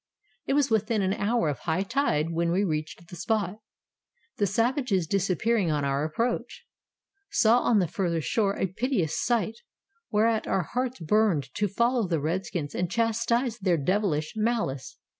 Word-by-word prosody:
It - - +1
was 285 -4 +2
within 220 -1 +1
an 190 0 +1
hour 210 -1 0
of 145 - -2
high 175 +3 -1
tide 195 - 0
when 170 0 0
we 190 +4 +2
reached 160 -1 -3
the 180 - -10
spot, 205 +1 -1 0.8
the 205 - +2
savages 230 - +1
disappearing 195 +3 +1
on 150 -2 0
our 140 +1 0
approach. 235 - -2 0.6
Saw 230 - +4
on 240 -2 +2
the 185 -4 +2
further 170 0 -1
shore 200 +5 0
a - - +1
piteous 190 - -1
sight, 230 -1 0 0.5
whereat 220 +1 +2
our 190 - +1
hearts 250 +8 -3
burned 165 -7 +1
to 210 - 0
follow 235 +2 +1
the 165 -3 0
redskins 160 -1 -3
and 180 -1 -1
chastise 235 +2 0
their 185 -4 +2
devilish 160 -1 0
malice. 215 - -1
200 Hz, 160 wpm, -27 LUFS, 170-230 Hz, 0.8 s, Saw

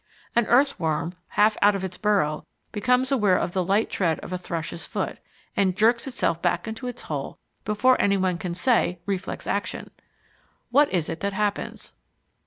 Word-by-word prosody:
An 235 -1 +3
earthworm 175 - +2
half 210 +1 +3
out 205 0 +5
of 195 - -3
its 185 -1 -4
burrow 195 -8 +1 0.3
becomes 250 +5 +1
aware 210 -9 +3
of - - -1
the 185 0 0
light 200 +5 +2
tread 165 -5 0
of 185 - -7
a - - -1
thrush's 170 -1 -5
foot, - - -4 0.4
and 190 -2 +1
jerks 235 +4 +3
itself 245 -10 -1
back 175 +5 0
into 225 +3 -5
its 245 - -6
hole 145 -3 -5 0.3
before 215 +5 +3
anyone 190 -3 +1
can 175 -1 -4
say 185 -3 +2
"reflex 195 -2 -3
action." - - -3 0.8
What 285 +3 +4
is 175 -4 0
it 160 - -4
that 200 +2 -2
happens? 205 0 -3
200 Hz, 170 wpm, -25 LUFS, 175-225 Hz, 0.8 s, out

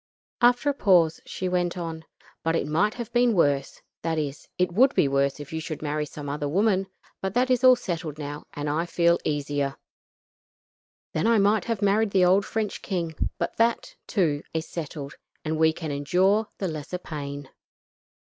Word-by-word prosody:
After 245 +3 +4
a 285 - +3
pause 180 - +3
she 185 - -3
went 180 -1 0
on: 165 -2 -5 0.4
"But 165 0 0
it - - 0
might 170 +9 +1
have 235 -1 -6
been 240 -2 +3
worse 145 -5 +1 0.2
that 165 -1 -1
is, 145 -2 -4
it 180 -1 +1
would 255 +9 +4
be - - +4
worse 140 +1 +1
if 145 +1 -9
you 160 - -2
should 155 -1 -6
marry 150 0 -1
some 145 0 -8
other 145 0 -2
woman; 195 +2 +2 0.3
but 190 +1 -3
that 255 +1 +2
is 255 0 +2
all 255 0 +8
settled 170 - -4
now 145 0 -6
and 145 0 -3
I 160 +4 0
feel 170 0 +3
easier. 145 -2 -1 1.4
Then 155 - +1
I 230 -1 +5
might 205 +1 +3
have 225 -3 -2
married 205 +2 +3
the 190 -2 +4
old 190 +3 +4
French 220 -2 -2
king, 170 -4 -2 0.2
but 170 - -3
that, 230 0 +1
too, 160 -8 +1
is 160 +1 -2
settled; 150 -3 -6 0.3
and 155 +1 -1
we 160 0 +5
can 160 -1 -5
endure 185 +9 +2
the 195 - -2
lesser 155 +2 -4
pain. 145 -5 -7
170 Hz, 185 wpm, -26 LUFS, 150-200 Hz, 1.4 s, all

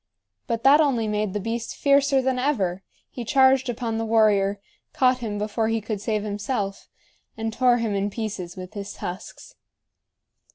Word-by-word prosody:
But 230 -1 -2
that 285 +3 +7
only 250 -7 +1
made 210 -2 -1
the 210 - -1
beast 225 +3 -4
fiercer 280 -1 +3
than 260 -1 0
ever; 200 -10 0 0.3
he 245 - -6
charged 265 +1 +4
upon 230 -1 -2
the - - -1
warrior, 210 -3 +3 0.3
caught 255 -1 +3
him 215 -4 -4
before 215 +2 -1
he 225 0 0
could 210 -1 -5
save 215 -1 -1
himself, 205 -1 -3 0.5
and 225 0 -3
tore 250 0 +3
him 230 -3 -1
in 200 +1 0
pieces 195 -5 -5
with 185 +2 -8
his 200 -2 -6
tusks. 180 +2 -8
225 Hz, 165 wpm, -24 LUFS, 205-250 Hz, 0.5 s, that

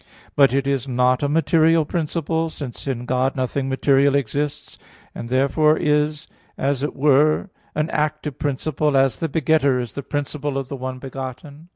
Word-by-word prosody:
But 140 -3 +5
it 135 +1 0
is 135 -1 -1
not 125 0 +2
a 145 - 0
material 165 0 +3
principle, 165 0 -1
because 140 -4 -8
in 125 -3 -3
God 130 +1 0
nothing 135 +1 -2
material 135 +1 +3
exists; 140 +2 -3 0.3
and 115 - -7
therefore 140 +4 +3
it 160 - -2
is, 150 +1 +1 0.3
as 135 -1 0
it 145 - -3
were, 150 +6 +3 0.2
an 155 +2 -1
active 150 -2 -2
principle, 145 +1 0
as 135 -3 +2
the 165 - -2
begetter 140 -3 +2
is 120 -3 -5
the 140 - -5
principle 145 0 -3
of 135 -1 -4
the 140 - -4
one 130 0 -5
begotten. 135 +4 -8
140 Hz, 170 wpm, -21 LUFS, 130-150 Hz, 0.3 s, But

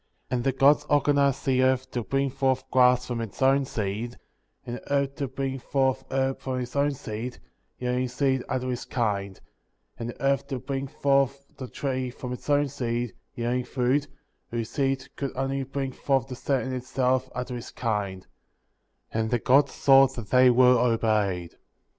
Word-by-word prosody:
^ - - -45
'12. - - 0
And 120 - -1
the 135 - +2
Gods 145 +2 +5
organized 140 -2 +2
the 130 -1 +3
earth 130 0 +1
to 120 - -2
bring 135 +3 0
forth 130 -1 +1
grass 125 -1 +5
from 120 -2 -3
its 115 -4 -7
own 135 +1 +4
seed, 110 +1 -3 0.5
and 120 0 -4
the - - -13
herb 140 -1 +1
to 140 - -2
bring 135 +1 -3
forth 135 0 0
herb 135 0 0
from 130 -1 -3
its 125 +1 -6
own 140 0 +2
seed, 115 +1 -6 0.4
yielding 125 0 -1
seed 130 0 0
after 130 -1 -1
his 125 - -3
kind; 100 -5 -2 0.6
and 115 0 -4
the - - -9
earth 135 -1 +1
to 135 - -3
bring 135 +2 -4
forth 140 0 +1
the 130 - -7
tree 130 -1 -2
from 125 0 -6
its 125 - -9
own 145 0 +3
seed, 120 -4 -3 0.2
yielding 120 +1 -1
fruit, 130 +4 0 0.4
whose 115 -1 -3
seed 135 -1 0
could 140 -2 -4
only 135 +1 -1
bring 135 0 -3
forth 135 0 0
the 130 - -6
same 135 +1 -1
in - - -3
itself, 130 0 0
after 125 0 -4
his 120 -1 -6
kind; 105 -5 -3 0.9
and 110 0 -1
the 120 - +2
Gods 135 +4 +4
saw 135 -1 +6
that 120 -5 -9
they 130 0 +7
were 125 0 +6
obeyed. 110 -7 +1
130 Hz, 185 wpm, -26 LUFS, 120-135 Hz, 0.9 s, they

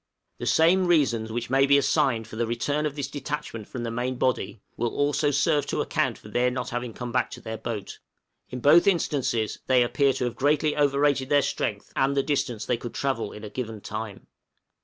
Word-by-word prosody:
The - - -4
same 180 +3 +4
reasons 120 -10 +2
which 120 +2 -4
may 135 +1 +4
be 140 0 +6
assigned 120 -5 +1
for - - -10
the 115 +1 -1
return 145 +6 -1
of 145 - -6
this 140 -3 -3
detachment 140 -6 -5
from 125 - -6
the 115 - -3
main 125 +2 -2
body, 125 -4 -1
will 120 0 -1
also 145 +3 +1
serve 145 +1 +1
to - - -2
account - - 0
for - - -14
their 125 +1 +2
not 125 0 -4
having 120 0 -3
come 120 +2 -6
back 125 - +1
to - - -9
their 110 - -6
boat. 105 -4 -5 0.5
In 125 - -6
both 155 +7 +6
instances 140 - 0
they 130 -1 +5
appear 140 +3 +2
to 125 - -2
have 120 - -3
greatly 150 +2 +2
overrated 140 -2 +2
their 145 -1 +4
strength, 105 -6 -3
and 140 +1 +1
the 140 - +3
distance 125 -7 -1
they 125 - 0
could 120 0 -8
travel 130 -6 -1
in 105 - -10
a 105 - -6
given 115 -4 -5
time. 105 0 -6
130 Hz, 210 wpm, -26 LUFS, 115-145 Hz, 0.5 s, be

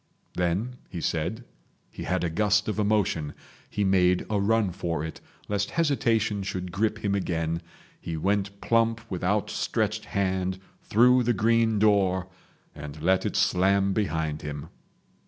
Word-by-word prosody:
Then, 95 +8 -1
he 90 - -5
said, 85 +9 -2 0.5
he - - -7
had 90 +1 0
a 85 - 0
gust 105 +3 +2
of 110 0 -2
emotion. 100 -8 +1 0.3
He 105 - -1
made 90 -2 +3
a 105 - +2
run 105 -1 +2
for 85 -3 -3
it, 80 - -8 0.3
lest 105 0 -1
hesitation 115 -10 +1
should 90 -2 -4
grip 110 +3 -1
him 100 - +1
again, 85 -4 -1 0.4
he 80 -1 -4
went 100 +3 -1
plump 115 -1 +2
with 90 -1 -3
outstretched 105 +2 0
hand 95 -1 -1 0.2
through 125 +3 +4
the 120 0 +2
green 115 +1 +2
door 95 -3 +3 0.5
and 75 +1 -8
let 95 +2 +3
it - - -4
slam 95 +2 +3
behind 80 -7 -1
him. 75 +1 -6
100 Hz, 145 wpm, -26 LUFS, 90-110 Hz, 0.5 s, through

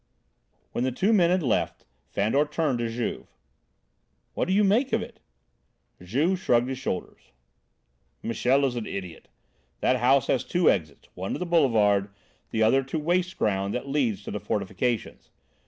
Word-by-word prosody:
When 120 - -2
the 130 - 0
two 190 - +1
men 175 -5 +4
had 180 -1 +2
left, 125 - -1 0.2
Fandor 110 +9 +1
turned 150 -4 -1
to 115 -1 -1
Juve. 115 +1 -4 1.1
"What - - -1
do 185 - +1
you 210 - +4
make 225 +7 +2
of - - +2
it?" - - -12 0.8
Juve 145 - 0
shrugged 120 -6 +2
his 130 -1 -4
shoulders. 95 -9 -5 0.9
"Michel 130 +4 +2
is 125 -2 -1
an 115 -3 -4
idiot. 90 -4 -7 0.5
That 130 - +2
house 130 +2 +3
has 130 - +1
two 175 -1 +3
exits; 75 -7 -4
one 95 +2 -4
to - - -2
the 180 - -3
Boulevard, 110 - +3 0.4
the 110 - +1
other 130 +5 +4
to 135 +4 -4
waste 175 +4 0
ground 100 -1 0
that 130 +3 -4
leads 120 -9 0
to - - -6
the 105 - -3
fortifications. 110 +3 -3
125 Hz, 165 wpm, -26 LUFS, 110-160 Hz, 1.1 s, men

